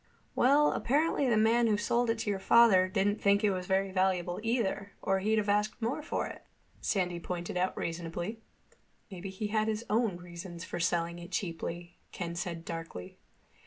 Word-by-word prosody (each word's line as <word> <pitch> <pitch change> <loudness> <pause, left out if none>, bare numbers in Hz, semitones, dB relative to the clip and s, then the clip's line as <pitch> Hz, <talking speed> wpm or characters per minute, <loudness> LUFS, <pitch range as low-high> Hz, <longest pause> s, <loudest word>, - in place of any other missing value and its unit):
"Well, 285 +4 +5
apparently 285 0 +1
the 225 - +3
man 230 +2 +4
who 210 -2 +2
sold 235 +3 +1
it 225 - +1
to 225 - -2
your 195 - -2
father 195 -3 +6
didn't 205 +2 0
think 200 +1 +3
it 210 - +4
was 185 -1 -3
very 195 0 +1
valuable 185 -2 0
either, 215 -3 -1
or 195 -1 +1
he'd 215 +3 +1
have 210 -1 0
asked 210 +2 +1
more 240 +6 -1
for 300 - -2
it," - - -9 0.4
Sandy 180 -4 0
pointed 175 0 -5
out 180 +1 0
reasonably. 170 +6 -4 0.7
"Maybe 190 +1 -6
he 200 +2 -4
had 215 0 +1
his 220 +1 -2
own 220 -4 +2
reasons 175 0 -8
for - - -5
selling 170 0 0
it 175 0 -9
cheaply," 170 -1 -4
Ken 170 -2 -4
said 170 -1 -4
darkly. 165 - -7
195 Hz, 180 wpm, -31 LUFS, 175-220 Hz, 0.7 s, father